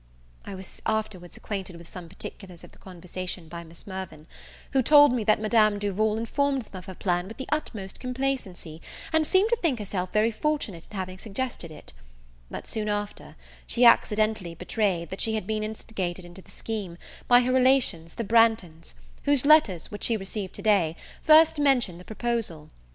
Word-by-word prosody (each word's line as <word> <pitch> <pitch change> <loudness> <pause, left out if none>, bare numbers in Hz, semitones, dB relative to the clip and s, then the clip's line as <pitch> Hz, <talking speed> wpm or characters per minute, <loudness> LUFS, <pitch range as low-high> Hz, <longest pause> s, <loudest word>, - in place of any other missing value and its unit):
I 195 - -7
was 190 0 -8
afterwards 215 -5 -3
accquainted 195 -3 -5
with 170 0 -12
some 175 -2 -10
particulars 185 -1 -9
of - - -13
the - - -21
conversation 180 -1 -7
by 170 +1 -8
Miss 165 0 -11
Mirvan; 185 -6 -7 0.5
who 270 - +3
told 290 +1 +7
me 240 -3 0
that 215 - +4
Madame 215 -1 +3
Duval 210 +2 0
informed 275 +4 0
them 205 - -16
of 180 - -13
her 190 -1 -8
plan 175 -1 -1
wih 225 - -9
the 265 - -5
utmost 220 -10 -3
complacency, 250 -11 -3 0.3
and 320 -1 +3
seemed 395 +4 +3
to - - +5
think 325 - 0
herself 190 -3 -4
very 215 +2 +2
fortunate 225 - -2
in 210 - -8
having 185 0 -5
suggested 225 -4 -4
it; 155 - -12 0.6
but, - - -7
soon 215 -1 -3
after, 205 0 -4 0.3
she 245 +1 +3
accidentally 215 -6 +3
betrayed, 180 -2 -1
that 190 - -5
she 220 -1 +1
had 215 - -3
been 215 +1 -2
instigated 185 -5 -5
to 190 - -11
the - - -23
scheme 205 -6 -5 0.3
by 245 0 +7
her 250 +1 0
relations 255 -11 +3
the 230 - -3
Branghtons, 220 -7 +2 0.3
whose 285 -2 +4
letters, 285 - +4
which 205 - -3
she 230 - +2
received 195 -1 -4
today, 190 -7 +2 0.3
first 315 0 +6
mentioned 250 -11 +2
the 180 - -13
proposal. 220 -9 -3
210 Hz, 180 wpm, -26 LUFS, 180-240 Hz, 0.6 s, told